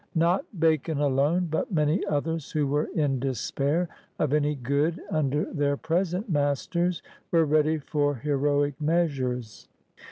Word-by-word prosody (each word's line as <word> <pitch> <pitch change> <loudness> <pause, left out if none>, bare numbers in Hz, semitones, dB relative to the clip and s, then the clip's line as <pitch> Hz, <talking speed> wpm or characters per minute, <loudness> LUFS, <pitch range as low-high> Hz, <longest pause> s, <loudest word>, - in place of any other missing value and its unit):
Not 170 +3 +1
Bacon 160 -1 +2
alone, 145 +5 +2
but 160 - -1
many 155 0 +2
others 155 +1 -1
who 150 -2 +1
were 145 +2 0
in 140 -5 +1
despair 140 +6 -1 0.3
of 150 -2 0
any 150 0 +2
good 140 +6 0
under 150 +1 +1
their 145 -3 +1
present 180 - -1
masters 165 +3 0 0.3
were 165 -2 +4
ready 155 +1 +2
for 145 -1 0
heroic 145 +2 +1
meas 160 -2 +1
ures. 125 -3 -4
150 Hz, 135 wpm, -26 LUFS, 140-165 Hz, 0.3 s, were